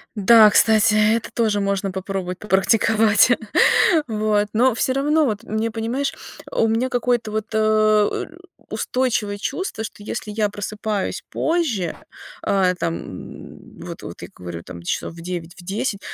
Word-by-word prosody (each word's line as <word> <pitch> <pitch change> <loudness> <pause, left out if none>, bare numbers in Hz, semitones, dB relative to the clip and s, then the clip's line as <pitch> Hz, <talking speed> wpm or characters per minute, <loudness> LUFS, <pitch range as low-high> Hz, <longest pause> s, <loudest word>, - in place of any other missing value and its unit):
Да, 215 +1 +7
кстати, 220 0 +4
это 215 +2 +2
тоже 215 -3 +1
можно 200 -1 -1
попробовать 190 -1 -4
попрактиковать. 215 +2 +3 0.8
Вот. 215 -2 0
Но 250 +3 +3
всё 255 +3 0
равно 295 +3 +2
вот 215 -4 -2
мне, 220 0 -2
понимаешь, 235 +5 -2 0.4
у 225 - +2
меня 225 +4 0
какое-то 245 -3 0
вот, 215 0 -2
э, 215 -1 +2 0.4
устойчивое 230 -5 -1
чувство, 220 - -4
что 215 -2 -9
если 210 0 -5
я 210 0 0
просыпаюсь 205 0 -4
позже, 275 - -1 0.5
э, 190 -2 +2
там, 165 0 -1
м, 90 - -11
вот - - -8
вот - - -9
я - - -7
говорю, 85 -2 -7
там, 85 0 -10
часов 90 - -3
в 165 - -11
9, 175 -1 -6
в 180 - -13
10, 200 +3 -3
215 Hz, 145 wpm, -21 LUFS, 195-230 Hz, 0.8 s, Да